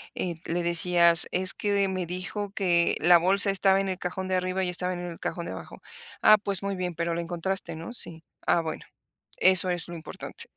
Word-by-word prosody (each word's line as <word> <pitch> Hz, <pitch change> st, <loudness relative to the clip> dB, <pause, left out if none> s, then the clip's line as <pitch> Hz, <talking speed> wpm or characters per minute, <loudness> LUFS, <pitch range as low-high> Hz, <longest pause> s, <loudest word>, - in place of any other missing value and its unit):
eh, 175 Hz, -2 st, -4 dB
le 175 Hz, +1 st, -3 dB
decías: 170 Hz, 0 st, +4 dB
"Es 185 Hz, +1 st, +1 dB
que 200 Hz, -1 st, -1 dB
me 185 Hz, -2 st, -4 dB
dijo 185 Hz, +3 st, -6 dB
que 175 Hz, -4 st, +1 dB
la 175 Hz, +3 st, +5 dB
bolsa 195 Hz, +3 st, +2 dB
estaba 195 Hz, 0 st, +2 dB
en 195 Hz, -, -4 dB
el 185 Hz, -, -4 dB
cajón 185 Hz, +1 st, -5 dB
de 185 Hz, -, -1 dB
arriba 185 Hz, +1 st, -2 dB
y 180 Hz, -, -2 dB
estaba 180 Hz, +1 st, -2 dB
en 175 Hz, -, -7 dB
el 170 Hz, -1 st, -9 dB
cajón 170 Hz, -, -5 dB
de -, -, -6 dB
abajo". -, -, -11 dB, 0.4 s
"Ah, 215 Hz, -, +6 dB
pues, 200 Hz, -2 st, -1 dB
muy 200 Hz, 0 st, -3 dB
bien, 180 Hz, -1 st, -4 dB
pero 170 Hz, 0 st, -3 dB
la 170 Hz, -, -3 dB
encontraste, 175 Hz, 0 st, -3 dB
¿no?". 165 Hz, +9 st, -9 dB
"Sí". 165 Hz, -8 st, +2 dB, 0.2 s
"Ah, 170 Hz, -, +2 dB
bueno. 160 Hz, -1 st, -6 dB, 0.6 s
Eso 185 Hz, 0 st, +7 dB
es 175 Hz, -2 st, -2 dB
lo 175 Hz, -, -8 dB
importante". 160 Hz, -1 st, -9 dB
180 Hz, 215 wpm, -25 LUFS, 170-190 Hz, 0.6 s, Eso